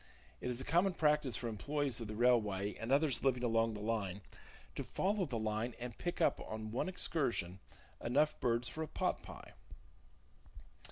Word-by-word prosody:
It - - -2
is 125 0 -2
a - - -3
common 175 +5 +2
practice 150 -4 +2
for 120 - -3
employees 130 +4 -1
of 115 - -4
the 105 - -5
railway, 105 -4 +3
and 115 +3 -5
others 140 0 +3
living 125 -2 +2
along 115 -1 +2
the 105 - -6
line, 105 -3 -1 0.5
to - - -4
follow 200 0 0
the 125 -4 -2
line 110 +2 -1
and 120 0 -5
pick 175 -1 -3
up - - +3
on 110 0 -5
one 125 +10 -1
excursion 120 - 0 0.4
enough 145 +6 +2
birds 120 -1 +1
for 160 - -4
a 160 - -2
pot - - -1
pie. - - -11
120 Hz, 175 wpm, -36 LUFS, 110-145 Hz, 0.5 s, railway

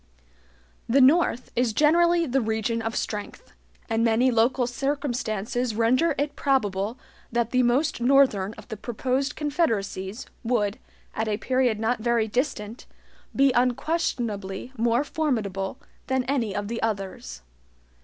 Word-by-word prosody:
The 265 +4 +4
North 270 -2 +3
is 240 -2 +1
generally 340 +5 +4
the 270 -1 +1
region 220 +1 -1
of 225 0 -3
strength, 210 - -5 0.3
and 225 0 0
many 235 +3 +3
local 245 +2 +2
circumstances 245 -4 -2
render 255 +8 +2
it 290 +1 -2
probable 215 -5 0 0.3
that 235 -1 0
the 255 - +3
most 250 +3 +1
Northern 240 -6 +3
of - - -13
the 220 - -5
proposed 260 +5 -2
confederacies 225 - -2 0.2
would, 220 -4 0 0.3
at 220 0 -2
a 210 -1 0
period 250 -2 +1
not 225 +1 0
very 235 -1 +1
distant, 230 -2 -3 0.5
be 275 0 +4
unquestionably 245 - -1
more 235 +2 +2
formidable 220 -11 -2 0.3
than 260 -1 +1
any 245 -6 -1
of 205 0 -2
the 230 +1 -4
others. 195 - -4
240 Hz, 130 wpm, -25 LUFS, 220-270 Hz, 0.5 s, The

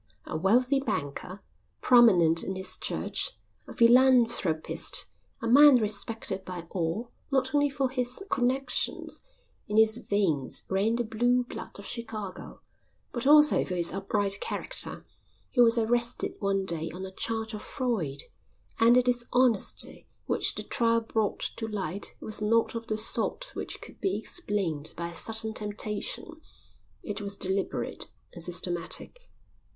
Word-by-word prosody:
A - - -6
wealthy 250 - +2
banker, 185 - -4 0.4
prominent 180 -10 +5
in 190 - -4
his 190 0 -5
church, - - -2 0.3
a - - -9
philanthropist, 235 -9 +4 0.4
a - - -1
man 285 +3 +8
respected 210 -3 -1
by 180 -2 -7
all, 180 +7 -3 0.2
not 270 +1 0
only 290 0 +3
for 275 -1 -1
his 250 +5 -3
connections 260 +2 -1 0.5
(in 210 - -2
his 220 +1 +4
veins 170 -10 -1
ran 200 +4 +1
the 240 - -1
blue 245 +3 +1
blood 245 - -9
of 200 - -10
Chicago), 220 -5 -7 0.5
but 240 +1 -3
also 300 +1 +6
for 180 - -4
his 170 -1 +1
upright 195 +1 0
character, - - -1 0.5
he 245 - +3
was 235 0 +5
arrested 235 +1 +1
one 195 -2 0
day 165 -3 -2
on 185 +3 -7
a 190 - -8
charge 220 +3 -3
of 210 - -6
fraud; 195 - -2 0.6
and 230 +2 +6
the 250 - +5
dishonesty 245 -2 0 0.2
which - - +4
the - - -4
trial 230 -1 +2
brought 220 -2 -2 0.2
to 225 - -4
light 200 -3 -4
was 215 -1 -4
not 225 +2 +2
of 230 0 -6
the 215 - -1
sort - - +2
which - - -6
could - - -13
be 385 - 0
explained 190 - -3
by 170 0 -4
a - - -10
sudden 220 +5 -3
temptation; 210 +9 -3 0.6
it 205 -1 -5
was 200 0 -4
deliberate 190 +1 -2 0.3
and 175 - -7
systematic. 175 - -1
220 Hz, 145 wpm, -28 LUFS, 190-245 Hz, 0.6 s, man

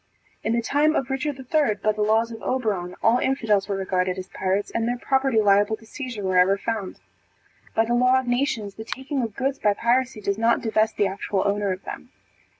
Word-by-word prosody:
In 220 - 0
the 235 0 0
time 300 +5 +2
of 265 0 -1
Richard 270 +1 -2
III, 265 -3 +1
by 215 +1 0
the 215 0 -4
laws 220 +2 +2
of 225 -1 -8
Oberon, 205 -9 -2
all 235 +2 +4
infidels 220 -8 +1
were 200 - 0
regarded 185 -1 -1
as 185 0 -7
pirates, 195 +2 -1
and 230 0 -1
their 245 +1 -1
property 265 -2 +1
liable 205 +1 +4
to 225 - -18
seizure 240 -3 -6
wherever 185 +1 +3
found. 215 -2 -4 0.8
By 225 - +3
the 240 - -1
law 250 +2 +4
of 260 - -5
nations, 245 -5 -1
the 220 - -8
taking 265 +4 -4
of 225 -4 -4
goods 270 +1 -1
by 205 -1 +2
piracy 245 +1 +1
does 200 0 -2
not 230 +1 +3
divest 220 -1 +1
the 205 - +3
actual 195 0 -1
owner 200 -1 0
of 185 +1 -5
them. - - -8
225 Hz, 210 wpm, -24 LUFS, 200-255 Hz, 0.8 s, all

